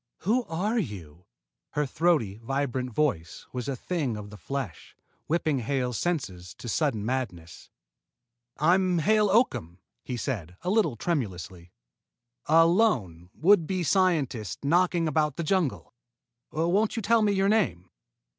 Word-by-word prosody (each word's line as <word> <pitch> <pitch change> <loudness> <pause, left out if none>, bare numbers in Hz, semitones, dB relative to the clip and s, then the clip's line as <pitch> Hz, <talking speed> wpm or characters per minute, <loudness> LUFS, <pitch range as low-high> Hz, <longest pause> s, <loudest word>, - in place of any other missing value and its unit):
"Who 230 +7 +1
are 205 +8 -1
you?" 90 - -7 0.5
Her 150 0 +1
throaty, 140 - +1
vibrant 130 +1 -2
voice 105 - -1
was 125 -2 -4
a 140 - -1
thing 140 -5 -2
of 105 -1 -8
the 105 - -10
flesh, 130 - -6 0.3
whipping 155 -3 +1
Hale's 125 -1 -1
senses 95 - -3
to - - -9
sudden 115 -4 0
madness. 110 -10 -4 0.9
"I'm 180 +3 +3
Hale 210 +4 +3
Oakham," 190 - +1 0.3
he 125 - -4
said, 95 - -4
a 180 - 0
little 195 - +2
tremulously, 95 - -4 0.8
"a 165 +2 +6
lone, 120 - +1
would 175 -1 +4
be 185 -2 -1
scientist 140 - 0
knocking 170 +1 +2
about 150 -2 +1
the 170 - -3
jungle. 170 -4 -1 0.6
Won't 180 +9 +1
you 225 - -3
tell 230 +2 +4
me 210 -1 +3
your 195 0 +2
name?" 175 - 0
145 Hz, 135 wpm, -27 LUFS, 110-180 Hz, 0.9 s, a